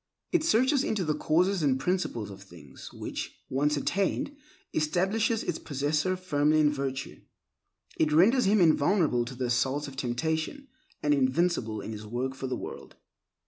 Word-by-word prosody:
It 350 -4 +2
searches 265 -1 +3
into 205 -8 -1
the 155 - +1
causes 175 +5 +1
and 135 -3 +2
principles 130 - -2
of 100 0 -11
things, 85 -8 -13
which, - - -6
once 145 +3 +1
attained, 195 - -1 0.4
establishes 195 +8 +1
its 170 - -3
possessor 150 +5 -1
firmly 155 -4 +2
in 150 -1 +4
virtue. 135 -1 -4 0.8
It 155 -1 +2
renders 210 - +5
him 205 +2 +4
invulnerable 155 -5 +3
to 130 +2 -8
the 125 0 -2
assaults 130 +4 0
of 135 - -9
temptation, 160 - -2 0.3
and 150 - +3
invincible 130 -4 +1
in - - -6
his 105 -1 -7
work 125 +4 -2
for 130 0 -5
the 125 -1 -2
world. - - -8
150 Hz, 155 wpm, -28 LUFS, 130-185 Hz, 0.8 s, renders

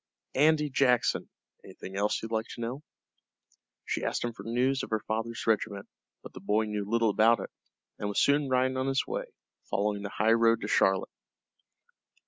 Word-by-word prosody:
"Andy 150 +1 +3
Jackson. 125 -2 +2 0.3
Anythin' 95 - -10
else 105 +2 0
you'd 115 - -6
like 110 0 -1
to - - -8
know?" 125 +5 -4 1.0
She - - -2
asked - - -1
him 120 -1 -2
for 100 - -11
news 125 +5 0
of - - -6
her 110 -1 -1
father's 115 +2 -3
regiment, 105 -2 0 0.4
but - - -11
the - - -9
boy 105 +3 +1
knew 105 -1 -4
little 115 -1 +2
about 115 +3 +4
it, - - -7 0.5
and 105 - -2
was 100 - 0
soon 140 0 +3
riding 130 0 +1
on 130 +1 -1
his 135 0 +1
way, - - -3 0.4
following 105 0 0
the 100 - -5
highroad 115 +2 +3
to - - -4
Charlotte. 95 -1 +2
115 Hz, 175 wpm, -29 LUFS, 105-130 Hz, 1.0 s, about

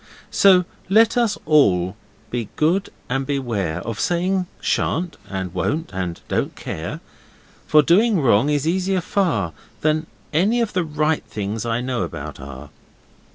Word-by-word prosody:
'So 185 -3 +5 0.2
let 220 +3 +5 0.3
all 95 - +3 0.4
be 120 -3 -3
good 175 +6 +1 0.2
and 135 +2 -1
beware 110 - -1
Of 115 -1 -5
saying 180 +6 0
shan't 175 +1 0
and 95 -2 -4
won't 150 - -2
and 90 -2 -3
don't - - -1
care; - - -5 0.7
For 150 -1 +6
doing 200 +5 +4
wrong 125 -1 +3
is 145 0 +1
easier 190 +2 +1
far 155 - 0 0.3
Than 155 +1 +1 0.3
any 200 +10 +3
of 230 -3 0
the 180 - +1
right 155 0 0
things 105 +2 -4
I 115 +1 0
know 125 -3 -2
about 85 -4 -5
are. 70 +1 -9
150 Hz, 140 wpm, -21 LUFS, -, 0.7 s, For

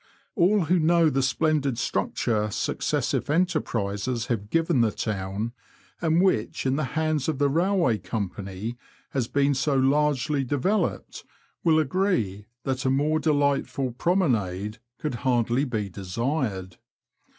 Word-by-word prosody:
All 200 +1 +3
who 175 +2 +2
know 165 0 +4
the 135 - +1
splendid 140 -1 +1
structure 110 -2 0
successive 100 - -1
enterprises 120 - 0
have 105 -2 -5
given 165 -3 +2
the 115 - +3
town, 100 +1 -3 0.5
and 165 +1 +3
which 125 - 0
in 130 0 +2
the 155 - 0
hands 155 -2 +1
of 155 - -1
the 145 +1 +3
Kailway 165 - +2
Company 100 +2 -4 0.3
has 130 -4 -1
been 140 +2 +2
so 140 +2 0
largely 145 +1 +2
developed, 145 - -1 0.4
will 160 -2 +4
agree 130 - 0 0.2
that 130 -1 -2
a 130 - +1
more 150 +4 +2
delightful 140 -3 +1
promenade 115 - 0 0.2
could 150 - -3
hardly 120 +1 +1
be 110 -6 -2
desired. 100 - -3
135 Hz, 130 wpm, -26 LUFS, 110-155 Hz, 0.5 s, know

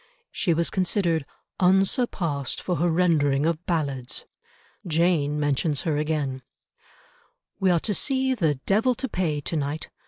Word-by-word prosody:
She 180 - 0
was 170 +1 0
considered 175 -5 0 0.3
"unsurpassed 185 - +1
for 180 -2 -2
her 175 - +2
rendering 155 -5 +2
of 165 0 0
ballads." 140 -7 -2 0.6
Jane 160 -3 +1
mentions 145 0 0
her 160 -3 -1
again— 150 -4 -1 1.2
"We 190 -2 +3
are 175 -2 +4
to 210 - -1
see 265 - 0
the 160 - +1
Devil 215 - +1
to 265 - -3
Pay 165 - -1
to 165 - -4
night. 150 +1 -3
165 Hz, 135 wpm, -25 LUFS, 145-185 Hz, 1.2 s, are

